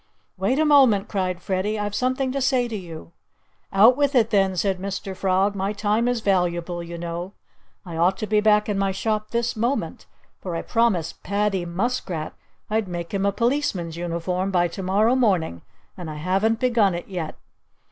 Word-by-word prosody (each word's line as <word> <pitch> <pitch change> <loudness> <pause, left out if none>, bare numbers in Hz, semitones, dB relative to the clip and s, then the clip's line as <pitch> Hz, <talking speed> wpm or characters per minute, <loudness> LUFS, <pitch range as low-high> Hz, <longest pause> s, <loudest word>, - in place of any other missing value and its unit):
"Wait 195 +8 0
a 310 - +3
moment!" 265 -9 +5
cried 185 -3 -2
Freddie. 195 +3 -1
"I've 205 -1 -3
something 255 +3 0
to 275 +1 -2
say 255 -1 +2
to 230 - -5
you!" 170 -4 -8 0.6
"Out 220 +6 +6
with 285 0 +1
it, 230 -2 +3
then!" 195 -3 +2
said 190 0 0
Mr. 195 0 -5
Frog. 190 +2 +1
"My 200 +1 -2
time 210 +3 +1
is 245 -2 0
valuable, 175 -3 0
you 170 0 -7
know. 170 +3 -5 0.5
I 170 -3 -6
ought 180 +3 +2
to - - -3
be 210 0 +2
back 210 0 +4
in 205 -2 -1
my 195 0 +1
shop 215 +2 -2
this 235 0 -1
moment; 235 +5 -2 0.3
for 180 -3 -5
I 165 - -3
promised 225 -9 0
Paddy 200 -2 0
Muskrat 175 -3 -3 0.3
I'd 215 -1 0
make 175 0 -6
him 200 0 +1
a - - +2
policeman's 230 - -1
uniform 175 +2 -2
by 175 -2 +2
to 190 - -7
morrow 205 +6 +2
morning. 185 - +1 0.3
And 175 -4 -7
I 155 - -6
haven't 195 +8 +1
begun 230 -7 +2
it 175 - -6
yet." 175 -5 -5
195 Hz, 185 wpm, -23 LUFS, 180-225 Hz, 0.6 s, Out